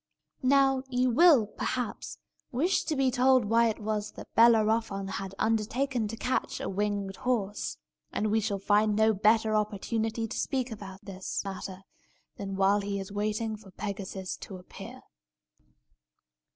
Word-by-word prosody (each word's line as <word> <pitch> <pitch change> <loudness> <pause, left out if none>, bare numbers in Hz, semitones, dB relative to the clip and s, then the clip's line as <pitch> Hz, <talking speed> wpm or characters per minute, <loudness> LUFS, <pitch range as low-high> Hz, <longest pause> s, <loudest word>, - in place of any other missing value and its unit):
Now 270 0 +4
you 250 0 +2
will, 285 -3 +6
perhaps, 245 +3 -4 0.3
wish 320 +10 +1
to 310 - -1
be 270 -2 +2
told 255 -1 +4
why 230 +2 +4
it 220 - -1
was 215 -1 -3
that - - -11
Bellerophon 225 -3 +4
had 195 0 -5
undertaken 225 +2 0
to 220 - -5
catch 255 +2 -1
the - - -4
winged 200 -1 -2
horse. 210 -5 -2 0.3
And 210 0 -1
we 220 - +3
shall 205 -2 -1
find 210 +2 +2
no 220 +1 +4
better 215 +2 +3
opportunity 220 +2 -1
to - - -4
speak 260 -2 -1
about 195 -3 -9
this 190 -1 -4
matter 190 -1 -6 0.5
than 195 -1 -5
while 195 +1 +3
he 200 0 -3
is 195 0 -7
waiting 215 +2 -1
for 205 -2 -15
Pegasus 190 -1 -5
to 190 - -8
appear. 180 - -11
215 Hz, 150 wpm, -29 LUFS, 200-235 Hz, 0.5 s, will